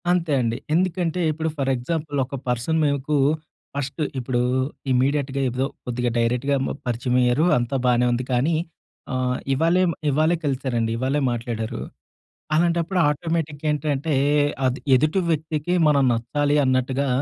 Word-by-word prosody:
అంతే 175 -3 +1
అండి. 115 -1 -1 0.2
ఎందుకంటే 180 0 0
ఇప్పుడు, 160 +1 -2
ఫర్ 135 -1 0
ఎగ్జాంపుల్ 145 +3 -3
ఒక 140 +2 -7
పర్సన్ 125 +7 0
మీకు 145 +1 0 0.6
ఫస్ట్ 140 +2 -3 0.2
ఇప్పుడు 125 0 -1 0.5
ఇమ్మీడియేట్‌గా 135 +1 +1
ఏదో 125 +2 -1 0.2
కొద్దిగా 125 0 -1
డైరెక్ట్‌గా 125 +4 +1
మ - - -2 0.2
పరిచయం 120 +1 -1
అయ్యారు 125 +6 +3
అంతా 120 +2 -1
బానే 125 0 +3
ఉంది. 120 +1 0
కానీ, 135 +7 +2 0.6
ఆహ్, 130 0 0 0.2
ఇవాళే 165 +6 +3 0.3
ఇవాళే 155 +4 +2
కలిసారండి. 130 -5 -1
ఇవ్వాళే 135 +4 0
మాట్లాడారు. 115 -2 -4 0.8
అలాంటప్పుడు 170 +2 +1
ఆటోమేటిక్‌గ 155 -1 -2
ఏంటంటే, 150 0 -1 0.5
అది 130 +1 0 0.2
ఎదుటి 155 +8 +2
వ్యక్తికి 155 +1 -1
మనం 140 -2 +4
నచ్చాలి 145 +6 0
అన్నట్టుగా 130 +2 +1
140 Hz, 130 wpm, -23 LUFS, 125-155 Hz, 0.8 s, మనం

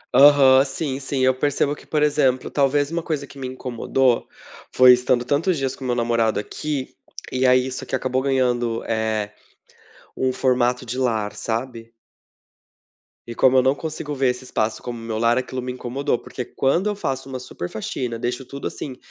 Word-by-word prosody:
Aham. 135 -1 +7
Sim, 135 0 -3
sim. 135 -1 -3
Eu 130 0 +4
percebo 145 +2 0
que, - - -17
por 150 -1 +1
exemplo, 130 -3 +1
talvez 145 +1 +1
uma 170 0 -1
coisa 155 -3 -3
que 140 0 -15
me 130 - -4
incomodou 130 0 0 0.4
foi 125 0 +8
estando 125 0 +1
tantos 155 +6 +1
dias 135 -1 -2
com 135 - -11
o - - -3
meu 120 - +1
namorado 115 -2 +1
aqui 140 +5 -4 0.4
e 130 0 +2
aí 125 0 +4
isso 130 0 -5
aqui - - -3
acabou 130 0 -1
ganhando, 125 -4 0
eh, 110 -2 -1 0.9
um 130 0 +1
formato 125 -1 +1
de 125 +2 -4
lar, 110 -5 0
sabe. 115 0 -4 1.4
E 120 - -6
como 130 +2 +4
eu - - +6
não 130 +1 +4
consigo 150 -1 -5
ver 135 -2 +1
esse 125 +1 -8
espaço 110 -3 -2
como 120 -1 -5
o - - -10
meu 115 -1 -4
lar, 115 +2 +3
aquilo 130 0 -3
me 125 0 -4
incomodou. 125 +1 -2
Porque 125 - -6
quando 155 - 0
eu 205 - -2
faço 135 -7 -4
uma 130 -1 -5
super 90 -8 -7
faxina, 115 +1 -4
deixo 125 +2 -3
tudo 140 +2 -6
assim, 130 -4 -7
130 Hz, 190 wpm, -22 LUFS, 120-135 Hz, 1.4 s, foi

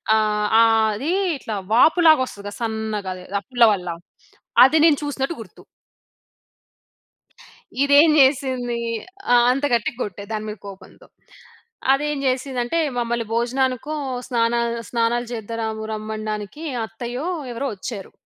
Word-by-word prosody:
ఆహ్ 210 -1 +1
ఆహ్, 225 -1 +4
అది 285 +11 -2 0.3
ఇట్లా 220 -4 -5 0.2
వాపు 320 +9 +5
లాగా 315 -4 +7
వస్తది 200 -5 -11
కదా! 205 - -6
సన్నగా 220 -3 -3
అది 180 - -11 0.2
ఆ - - -14
పుల్ల 245 -2 +5
వల్ల. 180 -2 -5 0.8
అది 300 +5 +3
నేను 310 -3 +5
చూసినట్టు 290 +2 -2
గుర్తు. 195 -6 -14 2.2
ఇదేం 285 +3 +6
చేసింది. 260 -3 +2 0.5
ఆ! - - +7 0.2
అంత 275 +3 -2
గట్టిగా 235 +1 -1
కొట్టా, 200 -1 -6
దాని 215 0 -3
మీద 210 - -6
కోపంతో. 195 -1 -13 0.9
అదేం 295 +1 -2
చేసిందంటే, 255 +2 -1 0.2
మమ్మల్ని 235 -1 -1
భోజనానికో, 255 +4 -1 0.3
స్నాన 235 -2 +1 0.3
స్నానాలు 240 +1 0
చేద్దా 230 0 -5
రము 220 0 -3
రమ్మనడానికి 215 +4 -5 0.2
అత్తయ్యో, 240 +6 -6 0.3
ఎవరో 270 +4 -3
వచ్చారు. 200 0 -7
235 Hz, 125 wpm, -22 LUFS, 215-265 Hz, 2.2 s, లాగా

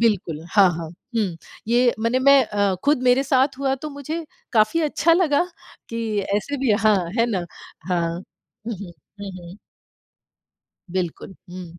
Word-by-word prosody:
बिल्कुल, 185 -9 +1
हाँ, 200 -3 +6
हाँ। 165 -1 -5 0.3
हुँ, 195 -7 0 0.3
ये 240 +1 +3
माने 230 +3 +1
मैं 275 0 +6
अ, 205 -2 +1
खुद 290 -3 +3
मेरे 250 +1 +4
साथ 265 0 +2
हुआ 270 -1 +1
तो 300 +3 -7
मुझे, 305 +4 -5 0.3
काफ़ी 220 +8 +3
अच्छा 315 +1 +2
लगा 330 -3 +3 0.4
कि 225 -2 -2 0.2
ऐसे 285 +7 -3
भी 260 -4 +2
हाँ, 215 -1 +4 0.2
है 230 - +4
ना? 185 -5 -1 0.4
हाँ। 170 -2 +1
हुँ, 220 +3 -10
हुँ। 185 -3 -9 0.3
हुँ, 200 - -5
हुँ। 175 +1 -11 1.3
बिल्कुल, 185 +1 -4 0.2
हुँ। 180 0 -7
230 Hz, 155 wpm, -22 LUFS, 195-275 Hz, 1.3 s, हाँ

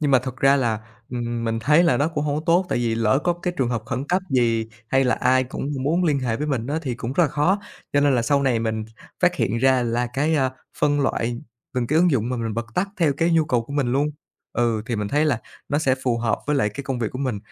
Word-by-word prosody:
Nhưng 145 -2 +1
mà 130 - +6
thực 130 0 -6
ra 135 +1 +4
là, 115 -5 0 0.3
ừm, 120 -1 -3
mình 115 0 -1
thấy 150 +8 +4
là 170 - +3
nó 150 +3 +2
cũng 150 -3 -2
hông 145 -1 0
có 155 - -3
tốt, 175 +2 +3
tại - - 0
vì 115 -2 0
lỡ 115 +3 +2
có 175 - +3
cái 175 +1 -3
trường 130 -3 +1
hợp 115 -3 -2
khẩn 130 +1 -3
cấp 185 +2 +1
gì, 115 -3 +2 0.2
hay 135 +2 +3
là 125 - +3
ai 130 0 +2
cũng 135 +2 -5
muốn 165 +6 +1
liên 150 -4 +2
hệ 115 -3 -1
với 150 - -3
mình 125 -6 -1
á 150 +4 -1
thì 130 -5 -2
cũng 120 +1 -4
rất 175 - +3
là - - +1
khó. 150 +7 +2 0.3
Cho 145 - +3
nên 145 -2 +4
là 120 - +2
sau 140 +3 +2
này 125 -4 +2
mình 110 -1 -2 0.4
phát - - +3
hiện 115 +4 0
ra 130 0 +3
là 120 +1 0
cái, 150 +4 +1
a, 135 -3 +2 0.3
phân 145 -1 +2
loại 120 -3 -1 0.4
từng 125 -2 0
cái 155 +5 +2
ứng 175 +1 +4
dụng 120 -5 +1
mà 125 - -2
mình 115 -2 -3
bật 115 +1 -3
tắt 195 +2 0
theo 160 -6 +2
cái 165 +2 +2
nhu 165 -1 +4
cầu 125 -6 +1
của 140 - -9
mình 135 -4 0
luôn. 145 +3 +1 0.4
Ừ, 115 -3 0
thì 120 -4 -2
mình 105 -1 -2
thấy 150 +2 +2
là 130 -6 +1 0.3
nó 145 - +1
sẽ 135 -4 +2
phù 120 -2 +1
hợp 115 -1 0
với 150 -1 +1
lại 105 -6 +2
cái 110 +7 -7
công 135 -3 -2
việc 115 -3 -1
của 130 - -6
mình, 130 -6 -1
130 Hz, 290 wpm, -23 LUFS, 120-150 Hz, 0.4 s, mà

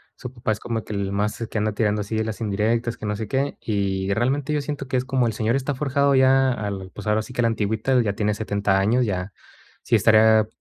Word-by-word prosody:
Su 125 - -8
papá 120 -3 -3
es 105 - -2
como 115 -2 -3
que - - -7
el 100 -1 -2
más 105 +3 -1
que - - -4
anda 105 0 0
tirando 105 -1 0
así 105 +2 -4
de 110 - +1
las 110 0 -5
indirectas, 115 +3 -1
que - - -7
no 105 - -1
sé 110 0 -5
qué. 140 +1 -1
Y 100 -2 -1
realmente 135 +6 0
yo 150 - 0
siento 140 -2 -5
que 130 - -3
es 125 - -1
como 130 -2 +1
el 115 - 0
señor 110 +3 0
está 135 +1 -1
forjado 140 +1 +1
ya 130 0 +4
al, 100 -4 -5
pues, 105 - -8
ahora 105 +1 +2
sí 125 - -11
que 120 - 0
a - - +1
la - - +4
antigüita, 110 +3 0
ya 105 -3 -1
tiene 105 0 0
70 100 -2 0
años, 120 +6 +2
ya 95 -2 -3 0.5
sí - - +2
estaría 110 0 +5
110 Hz, 255 wpm, -23 LUFS, 105-130 Hz, 0.5 s, estaría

